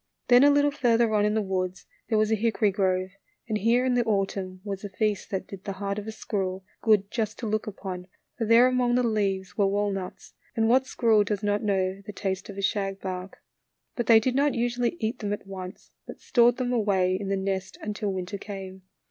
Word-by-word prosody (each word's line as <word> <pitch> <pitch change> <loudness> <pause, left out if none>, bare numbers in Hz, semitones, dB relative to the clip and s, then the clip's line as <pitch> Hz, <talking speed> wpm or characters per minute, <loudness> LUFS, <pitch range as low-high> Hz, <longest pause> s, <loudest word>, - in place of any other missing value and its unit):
Then 245 +1 +7
a 285 - +7
little 290 0 +4
further 235 -5 +2
on 210 -1 +3
in 210 +1 +1
the 220 - +1
woods 185 -1 -3 0.2
there 220 - +2
was 215 0 +2
a - - +4
hickory 220 -1 +1
grove, 185 -1 0 0.4
and 220 - -1
here 235 +4 +3
in 255 - +2
the 245 -1 +3
autumn 195 -3 -1
was 200 -1 -5
a 205 - -5
feast 210 +1 -1
tha/t 190 - -3
did 195 -1 -9
the 200 - -4
heart 200 +1 -3
of 210 - -8
a - - -3
squirrel 190 -3 -3 0.2
good 210 -3 +3
just 220 -2 -2
to 240 - -5
look 215 +1 -1
upon, 185 -3 -6 0.3
for 230 - -2
there 230 +2 +7
among 250 -1 +2
the 250 - +3
leaves 200 -4 -1
were 200 - +4
walnuts, 195 -2 -3 0.2
and 225 -1 +2
what 260 +3 +3
squirrel 225 -5 +3
does 205 0 -3
not 205 0 +1
know 195 -2 0
the 205 +1 -8
taste 190 0 -3
of 200 - -8
a 200 - -4
shagbark? 195 -2 -3 0.5
But 240 -3 -2
they 225 -1 +8
did 250 +3 0
not 280 0 +2
usually 240 +4 0
eat 225 +3 -2
them 205 -2 -2
at 205 - -6
once, 185 -1 -9 0.2
but - - -9
stored 240 0 +3
them 250 -1 -1
away 195 -5 +2
in 195 +1 -4
the 195 - +1
nest 190 0 -3
until 210 -1 -2
winter 190 +1 -4
came. 190 -2 -8
205 Hz, 220 wpm, -26 LUFS, 195-230 Hz, 0.5 s, they